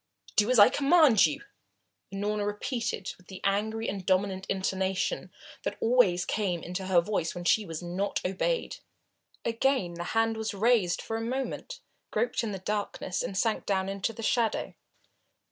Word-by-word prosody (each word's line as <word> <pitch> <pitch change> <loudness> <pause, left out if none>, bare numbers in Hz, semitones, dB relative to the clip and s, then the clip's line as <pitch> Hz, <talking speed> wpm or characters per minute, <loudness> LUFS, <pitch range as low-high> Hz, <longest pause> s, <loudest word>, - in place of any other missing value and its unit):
"Do 210 +2 +4
as 255 - +4
I 205 - +9
command 275 - +5
you," 150 - -5 0.7
Unorna 205 +1 -1
repeated 215 -1 -3
with 180 - -22
the 190 - -9
angry 220 +3 0
and 195 -1 -3
dominant 190 0 0
intonation 190 - -1 0.3
that - - -3
always 225 -7 +3
came 185 -6 -1
into 180 +2 -4
her 180 -2 +5
voice 170 -3 -2
when 175 - -5
she 210 +3 +3
was 165 +1 -5
not 180 +4 -2
obeyed. 330 - -1 0.7
Again 230 -5 +1
the 170 0 -5
hand 225 0 +2
was 220 -2 -3
raised 210 -4 +2
for 225 - -3
a - - -3
moment, 265 - -4 0.3
groped 480 - 0
in 220 - -2
the 195 - -4
darkness 200 -1 -3
and 190 - -4
sank 225 +1 0
down 190 -1 +1
into 195 +3 -2
the 225 0 -8
shadow. 230 0 0
205 Hz, 160 wpm, -29 LUFS, 190-225 Hz, 0.7 s, I